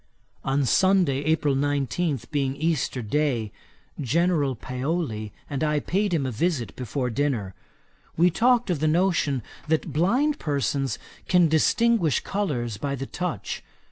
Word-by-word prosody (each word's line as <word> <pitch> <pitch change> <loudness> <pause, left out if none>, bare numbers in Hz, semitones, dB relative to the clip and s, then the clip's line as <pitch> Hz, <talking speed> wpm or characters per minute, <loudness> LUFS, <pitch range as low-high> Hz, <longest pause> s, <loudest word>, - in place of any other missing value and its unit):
On 135 +1 +1
Sunday, 185 -3 +3
April 155 -2 +2
19, 145 +1 0
being 135 -3 0
Easter 145 -5 -1
day, 120 -3 0 0.5
General 150 -1 +1
Paoli 125 -3 -3 0.2
and 140 +1 -3
I 150 -1 +2
paid 200 +6 0
him 155 -6 +1
a 130 - -2
visit 125 - -1
before 125 +1 -3
dinner. 115 -7 -1 0.6
We 175 +2 +5
talked 240 +3 +3
of 165 - -1
the 155 - +1
notion 155 - +1 0.2
that 160 -1 0
blind 250 - +2
persons 140 -4 -1 0.3
can 180 -2 +5
distinguish 175 - +3
colours 125 - -2
by 140 +5 -2
the 135 0 -5
touch. 180 +3 -4
145 Hz, 135 wpm, -25 LUFS, 130-175 Hz, 0.6 s, We